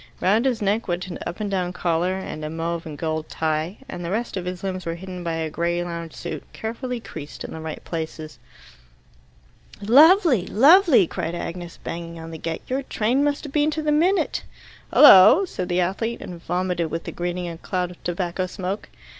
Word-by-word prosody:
Round 215 +7 +2
his 240 -4 0
neck 210 +3 0
went 175 0 -2
an 175 - -6
up 175 +3 -6
and 210 -2 -3
down 180 -2 -1
collar 175 +1 0
and 175 -5 -6
a 155 - -3
mauve 165 +1 -3
and 150 -2 -7
gold 160 0 -3
tie, 160 +4 -2
and 175 - -6
the 170 - -4
rest 225 +5 -2
of 185 -2 -4
his 180 0 -5
limbs 185 -1 -3
were 165 0 -3
hidden 180 0 -8
by 170 -1 -2
a 160 -1 -2
grey 170 +2 -1
lounge 170 -2 -6
suit, 170 - -5
carefully 240 +2 -4
creased 150 -9 -9
in - - -7
the 160 - -7
right 160 -1 -6
places. 160 -2 -6 1.4
"Lovely! 280 - +6
Lovely!" 300 - +6
cried 165 +1 -4
Agnes, 175 0 -6
banging 170 0 -6
on 165 0 -8
the 160 - -7
gate, 165 0 -4
"Your 260 +2 -1
train 255 +1 0
must 290 -1 0
have 290 -3 -8
been 300 0 +3
to 310 0 -3
the 300 - +1
minute." 350 +6 +2 0.5
"Hullo!" 265 - +9
said 185 - -5
the 180 +1 +2
athlete, 225 +6 -2
and 175 -2 -8
vomited 180 -2 -1
with 165 +1 -4
the - - -6
greeting 175 0 -3
a 165 -1 -7
cloud 180 -1 -2
of 175 - -16
tobacco 175 +1 -2
smoke. 190 +2 -5
180 Hz, 200 wpm, -23 LUFS, 170-225 Hz, 1.4 s, Hullo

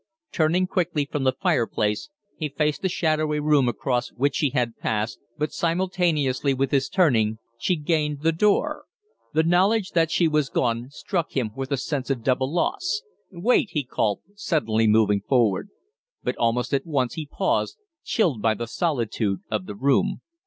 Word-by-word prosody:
Turning 170 +3 +2
quickly 170 -5 0
from 140 -1 -3
the 130 - +5
fireplace, 105 - 0 0.3
he 155 -2 -3
faced 150 +1 -1
the 190 - 0
shadowy 155 -3 0
room 150 -4 +3
across 125 0 -1
which 140 +3 +1
she 145 - +2
had 125 -3 -1
passed, 110 0 -2 0.2
but 150 0 -1
simultaneously 165 -6 +1
with 135 0 0
his 135 -1 +1
turning 115 - +2 0.2
she 180 +10 +1
gained 150 -2 -1
the 165 - +4
door. 295 - +1 0.5
The 160 - +4
knowledge 190 +5 +2
that 165 -2 +2
she 170 0 +3
was 150 -3 +1
gone 120 0 -1
struck 170 +3 -3
him 115 -5 0
with 135 +1 -5
a 140 - +1
sense 135 0 -3
of 130 -4 -1
double 130 +2 +1
loss. 375 - -1 0.3
"Wait!" 200 +4 +2
he 150 - 0
called, 110 -5 -1
suddenly 115 - +1
moving 105 -2 +4
forward. 120 - +1 0.5
But - - -1
almost 120 +3 0
at 140 +5 0
once 135 -6 0
he 160 -3 -5
paused, - - 0 0.3
chilled 160 - +1
by 110 0 +2
the 120 - -4
solitude 115 - -1
of 105 -4 -2
the 105 - -6
room. 140 - +1
145 Hz, 165 wpm, -24 LUFS, 120-165 Hz, 0.5 s, the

